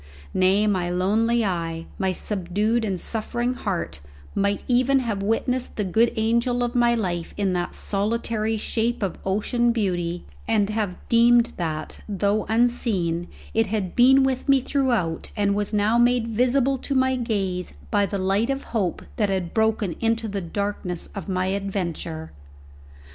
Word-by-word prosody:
Nay, 190 +3 +3
my 185 -4 +1
lonely 220 +6 +2
eye, 165 -3 -2
my 190 -1 +1
subdued 210 +5 -1
and 195 -4 -2
suffering 240 +4 -1
heart 190 - -3 0.3
might 200 0 0
even 255 +2 +3
have 230 -6 -1
witnessed 240 +5 0
the 210 - +1
good 225 +5 +3
angel 235 +2 +1
of 240 0 -2
my 240 -1 +3
life 175 -6 -3
in 195 -2 +1
that 175 -1 -2
solitary 220 +1 -1
shape 225 +1 -1
of 190 - -3
ocean 235 +5 +1
beauty, 175 -6 -1 0.2
and 215 -2 +2
have 210 -4 -1
deemed 235 0 +4
that, 155 -3 -4
though 205 +1 0
unseen, 220 -8 +1 0.3
it 225 -1 +2
had 200 -3 -2
been 265 +2 +6
with 265 +1 -1
me 275 -1 +6
throughout, 245 - 0
and 200 -1 +2
was 205 0 -1
now 215 +2 +2
made 240 -1 +3
visible 255 +3 +2
to 275 - -3
my 260 0 +3
gaze 195 - -2 0.2
by 200 - +3
the 200 - -3
light 195 +5 +1
of 275 0 -1
hope 195 -7 -1
that 210 -3 +1
had 185 -3 -2
broken 220 -5 +1
into 225 0 +1
the 200 -1 -3
darkness 185 -1 -3
of 200 -1 -6
my 185 -1 0
adventure. 185 -5 -3
210 Hz, 155 wpm, -24 LUFS, 190-235 Hz, 0.3 s, been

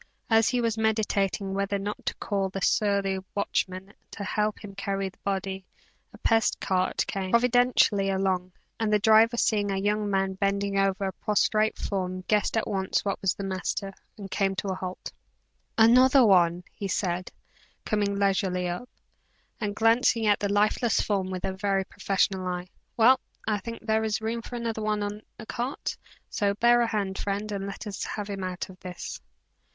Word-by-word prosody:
As 225 0 +5
he 245 0 +1
was 230 -1 0
meditating 205 -3 0
whether 200 +1 -1
or 195 0 -3
not 210 - -5
to - - 0
call 195 -3 -1
the 195 - -5
surly 200 -1 +1 0.2
watchman 190 -1 -2 0.2
to 205 - -7
help 210 +1 -1
him 200 -1 -8
carry 195 0 -2
the 185 - -24
body, 195 -1 -3 0.5
a - - -14
pest 225 0 +2
cart 185 -1 0
came, 190 -1 -3
providentially, 235 -4 +3
along, 190 -1 0 0.3
and 220 -1 0
the 210 - +5
driver 220 +3 +5
seeing 205 -3 +2
a 195 - -1
young 205 +1 0
man 195 -1 +1
bending 200 0 0
over 195 0 +1
a 190 - -2
prostrate 215 +1 +1
form 185 -2 -3
guessed 210 +3 +1
at 225 - 0
once 190 0 -1
what 200 - -2
was 195 - +1
the 200 - -6
matter, 195 +1 -3 0.2
and 195 -2 -8
came 195 -1 +1
to 190 +1 -3
a - - 0
halt. 185 0 -6 0.7
"Another 255 +3 +6
one!" 175 -3 +4
he 200 - -4
said, 180 -2 -2 0.5
coming 205 -2 0
leisurely 190 -2 +1
up, 180 +8 -5 0.7
and 205 -2 -2
glancing 225 0 +3
at 205 -1 +4
the 205 -1 -1
lifeless 215 +3 +2
form 195 -3 0
with 185 -1 -4
a 190 - -2
very 195 0 0
professional 190 -1 0
eye. 180 0 -3 0.3
"Well, 250 +3 +6 0.3
I 210 -2 +1
think 230 +4 -8
there 220 0 +2
is 220 -1 0
room 225 +1 -2
for 245 - -8
another 230 -2 -3
one 210 -1 0
in 205 +1 -4 0.2
the 220 - -9
cart; 245 +5 -3 0.3
so 200 -1 0
bear 240 +2 +4
a 235 - +2
hand, 200 -3 -2
friend, 205 +1 -2
and 200 -1 -3
let 200 +3 -7
us 205 -2 -5
have 210 -1 -4
him 195 -1 -4
out 185 -1 -4
of 185 -1 -14
this." 180 -2 -7
200 Hz, 185 wpm, -27 LUFS, 190-220 Hz, 0.7 s, Another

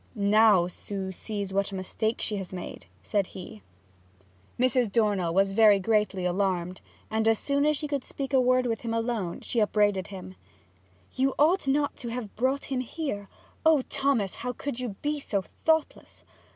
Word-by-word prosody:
'Now 205 -2 +5
Sue 190 +2 -5
sees 200 0 -5
what 200 0 0
a - - -5
mistake 220 +4 -2
she 210 - -1
has 190 -2 -6
made!' 180 - -7 0.2
said 195 - 0
he. 175 - -9 1.0
Mrs. 250 -3 +2
Dornell 200 -6 +2
was 195 +3 +3
verily 210 -1 +6
greatly 210 -2 +1
alarmed, 180 -1 -1 0.3
and 220 0 +1
as 225 -1 +4
soon 280 +4 +1
as 300 -1 +2
she 300 - -3
could 285 -3 -2
speak 275 0 -5
a 260 - +5
word 255 0 +3
with 230 -2 -1
him 230 -1 -2
alone 225 -6 -2
she 235 - -1
upbraided 205 -3 +2
him. 185 -1 -9 0.8
'You 265 +1 +1
ought 320 +2 +3
not 285 +1 +1
to 240 - -6
have 230 -3 -5
brought 265 +4 -1
him 260 - 0
here. 255 -6 -4 0.3
Oh 315 -4 +5
Thomas, 270 -9 +1
how 250 0 -4
could 265 -1 -5
you 240 -6 -4
be 295 0 0
so 200 -8 -2 0.2
thoughtless! 320 -1 0
220 Hz, 175 wpm, -27 LUFS, 195-260 Hz, 1.0 s, verily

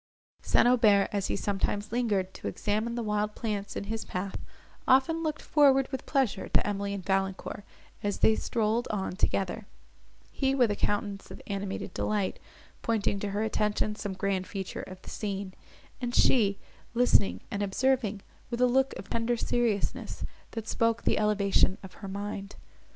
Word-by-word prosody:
St. - - +4
Aubert, 215 -5 +5
as 200 -2 0
he - - -1
sometimes 205 +1 -1
lingered 210 -6 0
to - - -6
examine 215 +3 -1
the 240 - -2
wild 210 0 0
plants 205 -3 -3
in - - -2
his 220 +2 -3
path, 190 +1 -4 0.5
often 270 +6 +4
looked 310 -2 -2
forward 270 -3 +5
with 265 - -5
pleasure 265 -9 +1
to - - +2
Emily 200 0 -1
and 190 - -7
Valancourt, 195 +1 -1 0.4
as 205 -1 -1
they 220 - +6
strolled 225 +1 0
on 190 -3 -2
together; 195 +2 0 0.6
he, 270 -1 +1
with 245 -5 +4
a - - 0
countenance 205 -1 -1
of - - -9
animated 200 -1 -4
delight, 205 -3 -1 0.4
pointing 210 -3 0
to 205 - -2
her 205 +2 -1
attention 210 -1 0
some 205 -2 -4
grand 190 -1 -1
feature 190 -2 -5
of 185 0 -9
the - - -9
scene; 200 -2 -4 0.5
and 245 -1 -2
she, 205 -6 +4 0.4
listening 245 -4 +4
and 205 - -2
observing 215 0 +1 0.3
with 240 -1 -3
a 250 - +6
look 265 +2 +2
of - - -8
tender 230 +1 0
seriousness, 230 -4 -1 0.3
that 225 -1 -5
spoke 230 0 +1
the - - +2
elevation 200 -2 +3
of 190 - -10
her 195 - -5
mind. 200 0 -5
210 Hz, 165 wpm, -29 LUFS, 200-235 Hz, 0.6 s, they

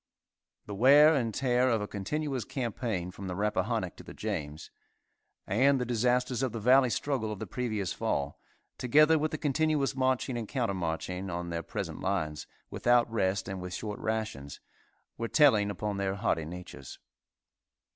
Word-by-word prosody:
The 105 - -7
wear 140 +8 +7
and 120 -6 0
tear 125 +1 +2
of 115 -2 +2
a 105 - -4
continuous 130 +6 -3
campaign 110 -6 -3
from 100 0 -8
the 90 - -4
Rappahannoc 105 +2 -1
to - - -11
the - - -11
James, 75 +1 -5 0.7
and 130 +7 +3
the 125 - -1
disasters 125 +1 +1
of 130 -4 -1
the 115 - -3
Valley 130 +3 +5
struggle 120 -4 -1
of 105 - -5
the - - -5
previous 110 -7 -3
fall, 70 0 -2 0.4
together 150 +5 +5
with 155 +1 0
the 155 - -4
continuous 150 -1 +1
marching 130 -1 0
and 110 - -5
counter 120 -5 -1
marching 90 +2 -3
on 85 0 -4
their 85 0 -2
present - - -5
lines, 90 -6 -2 0.2
without 120 -1 +2
rest 95 -3 0
and 95 -2 -5
with 90 0 -5
short 105 -2 -5
rations, 110 -11 -3 0.6
were 115 - -1
telling 115 -8 +4
upon 100 +1 -3
their 100 0 -1
hardy 95 -6 0
natures. 90 -5 -9
110 Hz, 165 wpm, -30 LUFS, 95-130 Hz, 0.7 s, wear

